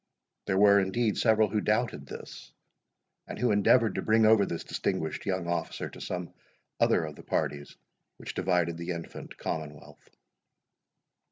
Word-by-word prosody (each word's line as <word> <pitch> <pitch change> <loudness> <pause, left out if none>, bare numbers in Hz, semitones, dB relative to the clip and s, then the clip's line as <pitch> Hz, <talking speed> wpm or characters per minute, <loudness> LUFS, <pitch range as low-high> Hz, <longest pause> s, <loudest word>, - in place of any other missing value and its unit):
There 95 - +1
were, 100 0 +6
indeed, 105 +3 0
several 110 -2 +4
who 105 +1 0
doubted 110 +3 0
this, - - -10 0.8
and - - -7
who 125 -2 +1
endeavoured 105 +1 +4
to - - -2
bring 110 0 +3
over 110 -2 +5
this 85 - -4
distinguished 80 +4 -3
young 95 -2 -1
officer 85 0 -3
to - - -11
some 90 -1 -5 0.5
other 80 - +3
of 75 -1 -8
the - - -12
parties 70 0 -2 0.4
which - - -7
divided 85 -2 0
the 85 +1 -6
infant 85 -1 -8
Commonwealth. 75 -2 -7
95 Hz, 150 wpm, -29 LUFS, 85-110 Hz, 0.8 s, were